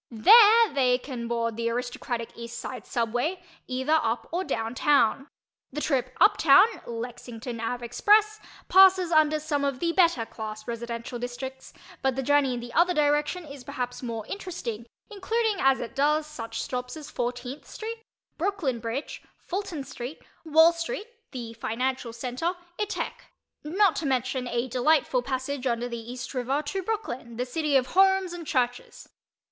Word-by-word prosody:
There 430 - +7
they 255 -3 +3
can 250 -2 -6
board 230 -1 -1
the 230 0 0
aristocratic 240 0 -3
East 235 0 -7
Side 250 -5 -7
Subway, 245 +10 -1 0.3
either 260 +5 +1
"up" 230 +1 -2
or 355 +3 -1
"down" 225 -9 -3
town. 275 -1 +2 0.4
The 295 - -4
trip 255 -4 -1
"up 410 +3 +6
town" 330 -1 +7 0.2
(Lexington 235 0 -6
Ave. 240 +1 -3
Express) 425 - +3 0.3
passes 375 -2 +6
under 310 -1 +4
some 295 -2 -1
of 275 -2 -1
the 340 -1 +1
better 335 -10 +3
class 215 -1 -7
residential 235 +1 -5
districts, 255 +2 -6 0.3
but 265 -2 +1
the 270 - -2
journey 280 -2 +3
in 240 - -5
the 240 0 -9
other 355 +1 +3
direction 300 +4 +1
is 280 -3 -10
perhaps 245 0 -5
more 230 -4 -4
interesting, 240 - -6 0.2
including 435 +1 0
as 270 -3 +3
it 235 - -6
does 300 +2 +2
such 230 -7 -6
stops 250 +3 -4
as 300 -2 -9
14th 245 +2 -4
St., 450 +1 -7 0.4
Brooklyn 340 -9 -1
Bridge, 230 +6 -5 0.2
Fulton 370 -6 -4
Street, 255 +2 -8 0.2
Wall 320 +1 +6
Street 370 +7 -4 0.2
(the 235 -4 -7
financial 245 +2 -2
center) 250 +9 -2 0.3
etc., 420 0 -2 0.5
not 365 +4 +3
to 310 - -2
mention 255 -1 -1
a 240 +1 -1
delightful 255 +1 +2
passage 260 +1 -3
under 240 0 -1
the 235 -1 -6
East 255 +2 -7
River 265 +3 -1
to 380 +6 -3
Brooklyn, 265 - -4
the 250 - -1
city 300 +2 -1
of 260 -2 +4
homes 385 -1 +4
and 340 -3 -8
churches. 245 -1 -2
265 Hz, 160 wpm, -27 LUFS, 240-330 Hz, 0.5 s, There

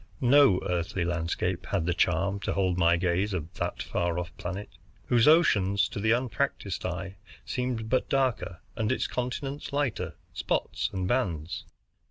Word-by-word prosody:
No 130 -6 +6
earthly 90 0 -1
landscape 85 +1 -1
had 95 -5 0
the 90 - +1
charm 90 +3 +1
to - - -2
hold 95 -2 +1
my 85 -1 +4
gaze 90 +3 0
of 85 0 -5
that - - -2
far 85 -1 -1
off 90 0 -4
planet, 95 +3 -5 0.4
whose 120 0 +4
oceans, 100 - +4
to - - -5
the 110 +2 +2
unpracticed 120 -5 -1
eye, 95 +2 -5 0.3
seem 125 0 -1
but 115 +3 -1
darker, 130 -10 0
and 110 0 0
its 130 - 0
continents 135 +4 -3
lighter, 140 -7 -1 0.2
spots - - -1
and 95 -1 -2
bands. 90 - -1
100 Hz, 155 wpm, -28 LUFS, 90-125 Hz, 0.4 s, No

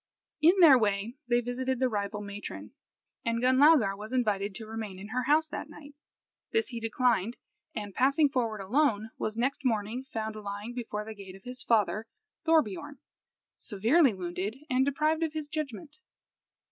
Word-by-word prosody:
In 345 +5 +5
their 285 -7 +9
way 210 +2 0
they 240 0 +3
visited 255 +2 -2
the 260 - +3
rival 210 -2 -3
matron, 205 0 -7 0.5
and 230 0 0
Gunlaugar 260 -4 +5
was 210 +3 -8
invited 205 -5 0
to 220 - -6
remain 215 -3 -6
in 200 +3 -9
her 250 +2 -1
house 310 +3 +3
that - - -6
night. 290 -1 -12 0.6
This 450 -1 +1
he 235 - -5
declined, 230 -1 +1 0.4
and, 205 -3 -5
passing 280 +6 +4
forward 230 -6 -1
alone, 220 0 +1
was 215 +1 -3
next 265 +4 -1
morning 230 +1 -1
found 220 -1 -3
lying 205 +2 -6
before 220 -4 -4
the 220 - -7
gate 195 -3 -11
of 195 - -15
his 250 +1 -6
father 215 -2 +1 0.4
Thorbiorn, 290 - +1 0.6
severely 235 - +2
wounded 185 +4 -4 0.2
and 255 +1 +4
deprived 305 +4 +1
of 320 -2 -1
his 310 -2 -4
judgment. 300 +1 -6
235 Hz, 160 wpm, -29 LUFS, 210-275 Hz, 0.6 s, their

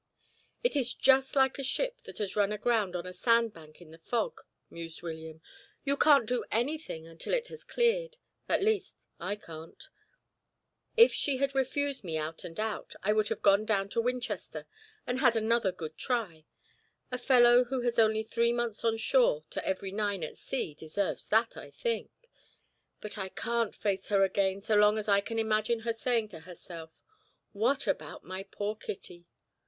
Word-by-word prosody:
"It 485 - +1
is 255 -4 +1
just 265 0 +4
like 265 0 +3
a - - -2
ship - - -1
that - - -10
has 205 -3 -2
run 205 -1 +2
aground 210 -3 +1
on 175 0 -3
a 180 - -7
sandbank 195 -7 0
in 155 - -16
the 165 - -14
fog," 240 - -2 0.3
mused 165 0 -8
William. 160 -1 -7 0.4
"You 280 0 +2
can't 285 -4 +5
do 250 0 0
anything 240 - -2
until 165 - -3
it - - -2
has 470 - -9
cleared 480 0 +1 0.3
at - - +2
least, 435 0 -1
I 205 - -2
can't. 165 -5 -11 1.1
If 465 +1 +8
she 280 -3 0
had 275 +1 0
refused 275 0 -1
me 165 -4 -2
out 155 +1 -4
and 165 +2 -8
out, 220 0 -3
I 210 +2 +3
would 215 -1 +2
have - - -3
gone 200 +1 +5
down 200 -2 0
to 230 - 0
Winchester 250 +1 -3 0.4
and 250 +1 -1
had 245 -3 +4
another 225 -2 +2
good 160 -3 -7
try 200 -11 -2 0.7
a 250 - -2
fellow 245 -1 +6
who 255 +1 -2
has 240 -1 0
only 220 -1 +4
three 235 +1 +1
months 240 -2 -2
on 225 -1 +2
shore 225 - +3
to - - -3
every 190 0 -2
nine 205 -3 -1
at 155 - -5
sea 255 - -4
deserves 160 +6 -3
that, 225 +1 +3
I - - -9
think 470 -1 -2 0.9
but 210 0 -6
I 190 -1 -3
can't 235 +2 -1
face 195 -2 -1
her 200 -2 +4
again 195 0 +1
as - - -16
long 210 0 +5
as 215 0 -3
I 200 -1 +4
can 225 +3 -5
imagine 220 +1 +1
her 230 0 -1
saying 230 -1 0
to 165 - -10
herself, 165 -1 -10 0.6
'What 230 +7 +1
about 150 -2 -3
my 185 +4 -5
poor 205 +2 -4
Kitty?' 175 -4 -8
220 Hz, 180 wpm, -30 LUFS, 190-250 Hz, 1.1 s, If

